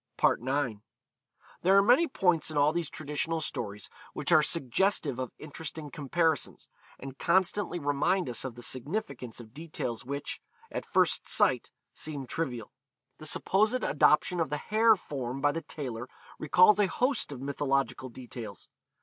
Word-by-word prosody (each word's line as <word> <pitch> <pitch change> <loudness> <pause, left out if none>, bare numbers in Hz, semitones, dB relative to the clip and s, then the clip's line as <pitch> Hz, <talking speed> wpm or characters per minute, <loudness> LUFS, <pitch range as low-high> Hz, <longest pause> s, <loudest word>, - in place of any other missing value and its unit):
IX. 130 -3 +1 0.8
There 190 +2 +5
are 200 - +6
many 250 +10 +5
points 180 - +1
in 155 - -3
all 145 +2 +4
these 170 -2 -2
traditional 155 +2 -2
stories 105 -9 -5 0.3
which - - -2
are 155 - +7
suggestive 150 - +1
of 130 -2 -3
interesting 155 0 -7
comparisons, 160 0 -1 0.3
and 135 0 -9
constantly 185 +1 +2
remind 150 +4 +1
us 120 - -3
of 130 -3 -5
the 120 - -9
significance 130 - -4
of 110 -1 -12
details 145 -6 -5
which, 140 +3 -5 0.3
at - - -5
first - - +2
sight, - - +2 0.2
seem 145 -3 -5
trivial. 125 -7 -4 0.5
The 155 - -6
supposed 215 +10 +2
adoption 155 +4 +3
of 165 - 0
the 150 - -1
hare 220 +6 +4
form 135 -7 -5
by 145 +1 +3
the 165 - -4
tailor 130 -6 -6 0.3
recalls 180 +7 +5
a 205 - +4
host 250 - +1
of 135 - -6
mythological 135 -1 -1
details. 115 -5 -9
145 Hz, 150 wpm, -29 LUFS, 130-175 Hz, 0.8 s, are